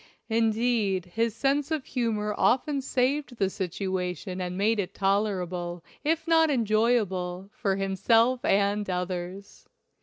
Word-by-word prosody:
Indeed, 220 -4 +1
his 230 -1 0
sense 275 +4 +1
of 310 -4 -2
humor 215 -4 -1
often 275 +2 +2
saved 265 0 0
the 195 -2 +1
situation 185 0 -3
and 180 0 -4
made 215 +2 +2
it 185 - -3
tolerable, 185 -4 -1 0.2
if 320 +2 0
not 325 -1 +5
enjoyable, 215 -6 +1
for 195 -2 0
himself 225 +6 +2
and 200 +1 +1
others. 180 +2 -5
210 Hz, 120 wpm, -27 LUFS, 190-245 Hz, 0.2 s, not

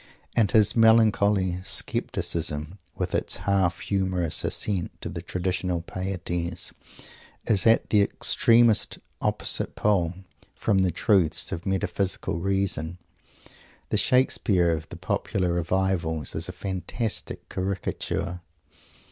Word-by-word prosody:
And 110 -5 +3
his 105 -1 +4
melancholy 105 -5 +4
scepticism, 90 -5 0 0.2
with - - -3
its - - -1
half 95 -3 +1
humorous 95 -4 0
assent 95 -5 -2
to - - -5
the - - -6
traditional 90 -1 -2
pieties, 85 -2 -4 0.7
is 105 -2 +2
at 115 - +3
the 105 - +5
extremest 115 +2 +3 0.2
opposite - - 0
pole 95 -5 +1 0.4
from 100 -3 +1
the 95 -1 +3
"truths" 85 -2 +1
of 90 0 -5
metaphysical 95 -2 -1
reason. 95 -3 -1 0.9
The - - +1
Shakespeare 105 -8 +2
of 80 -1 -3
the - - -8
Popular 90 -3 -1
Revivals 85 -3 -1
is 80 +3 -4
a - - -3
fantastic 95 +4 -4
caricature. 95 -1 -3
95 Hz, 110 wpm, -26 LUFS, 85-100 Hz, 0.9 s, the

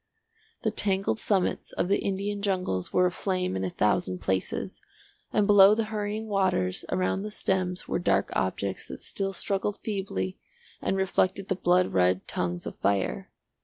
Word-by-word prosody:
The 220 - +1
tangled 195 0 +1
summits 195 -4 0
of - - 0
the 200 - +2
Indian 200 +1 -2
jungles 185 - -1
were 180 - +4
aflame 180 - -1
in 95 - -2
a 95 - 0
thousand 95 -2 +1
places, 95 0 -2 0.5
and 210 - +3
below 205 0 +8
the 225 - +1
hurrying 210 +1 -2
waters 185 - +1
around 185 +1 0
the 210 - -4
stems 185 -3 -1
were - - 0
dark 100 - +1
objects 95 +1 -2
that - - -8
still 195 0 -2
struggled 195 +2 -1
feebly 190 - -3 0.4
and 195 - 0
reflected 190 0 0
the 190 - +1
blood 180 0 +2
red 90 0 +2
tongues 90 0 -2
of - - -7
fire. 95 -10 0
185 Hz, 160 wpm, -27 LUFS, -, 0.5 s, below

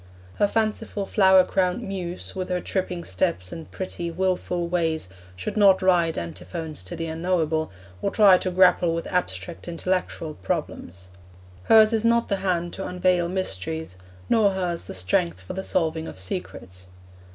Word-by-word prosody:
Her 205 - +3
fanciful 215 -1 -1
flower 190 -2 +5
crowned 180 0 0
Muse, 185 -2 -5
with 185 -1 -4
her 180 0 0
tripping 180 -1 -3
steps 90 0 -1
and 165 - -8
pretty, 175 -2 -4
wilful 180 0 -1
ways, 165 - -1 0.3
should 90 - -5
not 195 -3 +5
write 175 -3 +3
Antiphons 90 - -5
to 175 - -6
the 165 0 -4
Unknowable, 160 -1 0 0.3
or - - +1
try 200 -3 +6
to 185 - -2
grapple 180 -2 +4
with 165 - -3
abstract 180 -1 -3
intellectual 170 -2 -2
problems. 95 -2 -4 0.6
Hers 220 0 +6
is 220 -1 +1
not 235 0 +2
the 200 - +1
hand 175 -3 -1
to 195 - -5
unveil 180 -1 +1
mysteries, 160 - -2 0.3
nor 215 -3 +4
hers 180 -3 -2
the - - -7
strength 90 -1 0
for 95 - -8
the 190 - -3
solving 160 -3 -1
of - - -9
secrets. 90 0 -6
175 Hz, 155 wpm, -24 LUFS, 160-190 Hz, 0.6 s, try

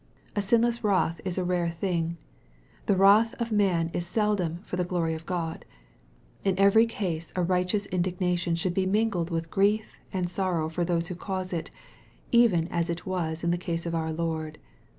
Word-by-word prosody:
A 205 - +1
sinless 235 +3 +2
wrath 185 -5 +1
is 185 -1 -2
a 185 - +1
very 180 0 +1
rare 170 -1 0
thing. 170 -1 -2 0.7
The 200 - +4
wrath 205 +4 +5
of 235 -1 -2
man 180 -6 +2
is 175 0 -2
seldom 195 -5 0
for - - -5
the 180 - 0
glory 170 -2 -1
of 160 0 -7
Grod. 170 -3 -3 0.8
In 195 -2 +1
every 200 +4 +6
case 170 -8 -3
a 180 - +1
righteous 180 +3 +1
indignation 180 -1 0
should 175 +2 -1
be 185 0 +1
mingled 200 -4 +1
with 165 -1 -3
grief 210 +2 +1
and 185 -2 -1
sorrow 175 -3 -1
for 175 +2 -1
those 170 -1 0
who 180 - -4
cause 185 0 -4
it, 165 -1 -3 0.6
even 220 -9 +4
as 170 0 -1
it 170 0 -3
was 170 -3 -2
in 170 - +2
the 175 - 0
case 170 -1 -3
of 170 - -2
our 160 -1 -1
Lord. 160 -1 -3
180 Hz, 190 wpm, -27 LUFS, 170-195 Hz, 0.8 s, every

